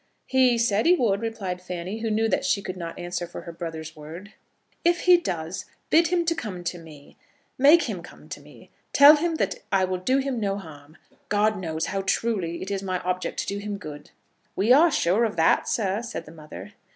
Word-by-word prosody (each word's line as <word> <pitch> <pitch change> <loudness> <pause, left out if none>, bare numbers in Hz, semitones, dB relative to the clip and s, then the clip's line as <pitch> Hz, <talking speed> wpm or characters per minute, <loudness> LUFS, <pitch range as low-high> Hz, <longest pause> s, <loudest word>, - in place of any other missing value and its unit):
"He 255 -2 +3
said 225 +1 +2
he 360 - +6
would," 215 - +1
replied 200 -6 -4
Fanny, 180 +3 -5
who 225 0 -2
knew 220 +1 +1
that 210 - 0
she 200 - 0
could 185 - -5
not 170 -2 -7
answer 175 0 -4
for 175 - -8
her 170 - -8
brother's 160 -2 -7
word. 165 +7 -10 0.5
"If 345 +1 +2
he 360 -1 +7
does, 175 - -3 0.3
bid 330 +1 +5
him 345 0 0
come 215 - -3
to 175 0 -4
me. 155 -4 -15 0.4
Make 300 +6 +7
him - - -4
come - - -14
to - - -7
me! - - -17 0.2
Tell 290 +2 +9
him 330 +2 -1
that 485 - -1
I 190 -2 +3
will 185 0 -3
do 255 +9 +1
him 270 -3 -1
no 200 -2 -1
harm. 155 -4 -12 0.3
God 210 +1 +2
knows 165 -4 -3
how 195 - -2
truly 190 -4 -1
it 190 - -6
is 195 -1 -2
my 185 -2 -2
object 180 0 -3
to - - -5
do 200 +1 -3
him 205 0 -5
good." 150 -6 -10 0.5
"We 215 +6 +4
are 320 +6 +6
sure 225 - +2
of 220 -5 -1
that, 165 -1 +3
sir," 200 -1 0
said 235 -8 -6
the 155 - -12
mother. 155 +5 -11
195 Hz, 210 wpm, -25 LUFS, 175-235 Hz, 0.5 s, Tell